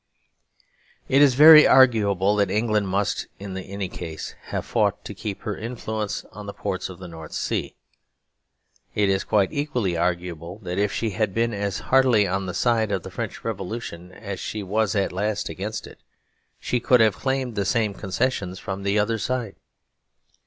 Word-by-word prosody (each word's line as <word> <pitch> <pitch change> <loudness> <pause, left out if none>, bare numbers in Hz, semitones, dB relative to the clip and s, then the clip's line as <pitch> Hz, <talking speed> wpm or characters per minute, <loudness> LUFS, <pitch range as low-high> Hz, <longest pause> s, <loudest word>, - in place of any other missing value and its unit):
It 135 +2 +4
is 140 -4 +6
very 155 +2 +10
arguable 105 -6 +4
that 100 -1 +2
England 105 -2 +1
must, 100 +2 -1
in 100 -1 -7
any 95 +1 -5
case, 80 -4 -7
have - - -4
fought - - 0
to - - -6
keep 105 -3 -6
her 105 - -3
influence 110 -2 -4
on 105 +1 -9
the 100 - -7
ports 95 -2 -3
of 95 - -9
the 90 0 -9
North 80 -2 -10
Sea. - - -2 1.2
It 105 -1 +2
is 95 0 +1
quite 100 -3 +1
equally 125 - -1
arguable 85 0 -2
that 90 +1 -3
if 100 -1 +1
she 110 -2 -2
had 105 -1 -1
been 115 0 +1
as 100 0 -2
heartily 125 -6 +5
on 95 0 -2
the 90 - -4
side 115 -3 +1
of 95 -4 -1
the - - -8
French - - -5
Revolution 95 -4 -5
as 100 -1 -7
she 105 -1 -4
was 105 +1 0
at 100 -1 +1
last 105 +2 -1
against 105 +3 -5
it, - - -14 0.6
she 125 - -1
could 125 +1 +4
have 110 -3 +4
claimed 130 -2 -1
the 100 -2 -1
same 105 +3 +1
concessions 100 -1 -2
from 95 +1 -5
the 100 +1 0
other 110 +2 +1
side. 120 -1 -2
100 Hz, 175 wpm, -24 LUFS, 95-115 Hz, 1.2 s, very